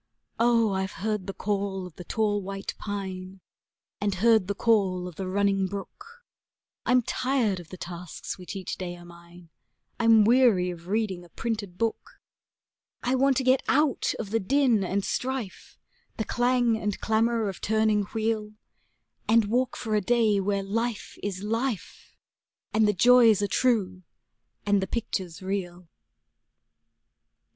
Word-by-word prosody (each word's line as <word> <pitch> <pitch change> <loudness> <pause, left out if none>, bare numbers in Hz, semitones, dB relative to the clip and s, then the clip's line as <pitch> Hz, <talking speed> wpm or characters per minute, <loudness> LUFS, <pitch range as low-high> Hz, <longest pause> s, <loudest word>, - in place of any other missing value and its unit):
Oh, 230 -2 +3
I've 190 +1 -2
heard 210 -3 -1
the 195 - -4
call 195 -2 -2
of 180 -4 -11
the 180 - -9
tall 205 +1 0
white 195 +1 -5
pine, 190 -2 -5 0.6
and 205 -1 0
heard 220 0 +4
the 200 - -2
call 195 -6 +2
of 180 - -8
the 190 +1 -4
running 195 0 +1
brook; 410 - -9 0.6
I'm 250 0 +4
tired 245 -6 0
of 170 -2 -12
the 185 - -9
tasks 175 -1 -7
which 180 +2 -9
each 190 -1 -5
day 175 -1 -4
are 175 - -13
mine, 170 0 -15 0.5
I'm 225 -2 +6
weary 225 -7 +4
of 170 0 -11
reading 200 -3 -1
a 175 - -16
printed 205 -3 -4
book; 225 +1 -3 0.8
I 250 - +1
want 265 0 +3
to 265 - +1
get 260 +1 +4
out 295 -1 +2
of 210 -3 -6
the 225 - +2
din 245 -1 +2
and 195 +2 -1
strife, 255 -6 -4 0.4
the 220 - -2
clang 245 -1 +2
and 210 -2 -2
clamor 225 0 +1
of 195 - -6
turning 215 -1 +2
wheel, 215 0 -2 0.8
And 225 0 +5
walk 255 +2 +1
for 220 -2 -4
a 210 - +3
day 225 -2 +2
where 200 0 0
life 230 +2 -3
is 195 -1 -4
life, 225 0 -3 0.6
and 215 0 +4
the 210 - +3
joys 230 0 +6
are - - +1
true 200 -7 +1 0.6
and 205 -1 +3
the 190 - -2
pictures 190 -5 -4
real. 180 -2 -4
205 Hz, 150 wpm, -27 LUFS, 190-230 Hz, 0.8 s, I'm